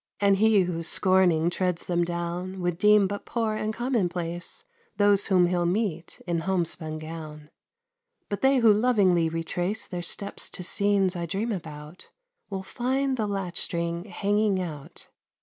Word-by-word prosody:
And 200 -1 +4
he 215 -1 +4
who 175 -2 -2
scorning 175 -1 +2
treads 180 -1 -1
them 175 -1 +1
down 175 +2 -4
Would 175 -1 -1
deem 210 0 +5
but 200 +1 -4
poor 225 -2 -1
and 215 0 -2
common 235 -5 0
place 175 - -5 0.3
Those 205 -1 +3
whom 185 -2 +4
he'll 175 -1 +1
meet 180 -3 -2
in 170 -2 -1
homespun 165 -3 -2
gown. 155 -1 -9 0.8
But 205 -1 -4
they 270 0 +4
who 230 -4 +6
lovingly 200 -7 +3
retrace 175 +5 -2
Their 180 -2 -5
steps 200 +3 -3
to 180 - -7
scenes 195 0 +1
I 170 -1 -3
dream 205 +8 -2
about, 155 -3 -8 0.4
Will 195 -2 -4
find 265 +5 -1
the 220 -4 -1
latch 195 -4 -2
string 170 +1 0
hanging 205 -1 0
out. 155 -6 -7
185 Hz, 155 wpm, -26 LUFS, 170-205 Hz, 0.8 s, who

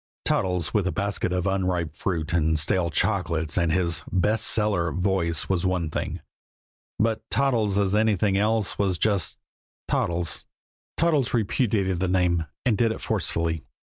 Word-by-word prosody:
Toddles 90 -2 0
with 100 -4 +1
a - - 0
basket 100 -2 -2
of 90 -1 -1
unripe 90 -5 -1
fruit 80 -4 -2
and 80 -2 +2
stale 85 +3 +1
chocolates 85 -5 0
and 85 -3 +2
his 85 -2 +1
"best 105 +4 +1
seller" 100 -6 +2
voice 90 -3 0
was 95 -3 0
one 90 -4 0
thing; - - -3 0.8
but 110 0 +1
Toddles 115 -4 +1
as 100 -1 +1
anything 105 -2 +2
else 105 0 +1
was 95 -3 +1
just 100 0 0 0.5
Toddles. 85 -1 -1 0.5
Toddles 150 -7 +2
repudiated 100 -4 0
the 95 - 0
name, 90 -3 +1 0.2
and 110 -6 +2
did 115 -1 +3
it - - -5
forcefully. 80 -1 -1
95 Hz, 150 wpm, -25 LUFS, 85-105 Hz, 0.8 s, did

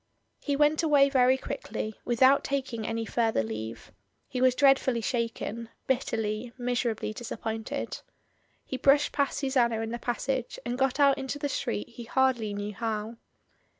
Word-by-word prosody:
He 285 - -1
went 300 +2 +3
away 290 -4 +5
very 260 -1 +4
quickly, 240 - -5
without 260 +3 +4
taking 255 -5 -2
any 225 0 -2
further 225 - +1
leave. 110 +1 -6 0.4
He 250 - -3
was 255 -1 +4
dreadfully 270 -3 +4
shaken 230 -1 -3
— - - -47
bitterly, 230 -3 -1
miserably 240 -3 -1
disappointed. 220 -1 -4 0.7
He 260 - -4
brushed 280 +2 +4
past 280 -1 0
Susanna 250 -5 +1
in 225 0 -3
the 240 - -4
passage, 250 +1 -2
and 240 0 -2
got 270 +1 0
out 280 -1 +5
into 270 +1 -4
the 290 0 -2
street 105 - -2
he 240 - -9
hardly 245 -3 +1
knew 205 +1 -4
how. 220 +1 -3
245 Hz, 150 wpm, -28 LUFS, 225-270 Hz, 0.7 s, away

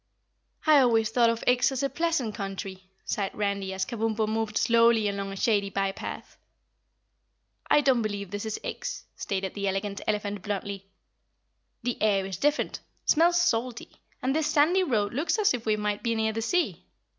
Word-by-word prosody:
"I 305 -2 +7
always 225 -4 +3
thought 235 0 +4
of 230 0 -2
Ix 245 +1 +3
as 265 0 -2
a - - +3
pleasant 325 -10 -1
country," 195 -2 -6 0.2
sighed 200 -2 -2
Randy 200 -2 -1
as 190 0 -2
Kabumpo 220 -2 -1
moved 220 0 -1
slowly 230 -2 +4
along 200 -1 -3
a - - -6
shady 200 -1 +1
by 195 0 0
path. - - -8 1.3
"I 295 - +5
don't 260 -4 +3
believe 205 -3 -4
this 205 +2 -4
is 220 - -3
Ix," - - -5
stated 190 -1 -3
the 200 -1 -2
Elegant 195 +1 -2
Elephant 205 -1 -1
bluntly. 200 -1 -4 1.0
"The 245 0 -2
air's 195 -4 +1
different, 295 - 0 0.3
smells 345 +2 +4
salty, 245 -7 0 0.3
and 265 +2 +1
this 315 -1 +1
sandy 315 +5 +4
road 220 - 0
looks 300 - 0
as 425 -1 +3
if 230 -2 -5
we 215 - +3
might 210 -1 -2
be 230 -1 0
near 220 0 0
the 225 - -2
sea. 350 +10 0
220 Hz, 170 wpm, -27 LUFS, 200-250 Hz, 1.3 s, I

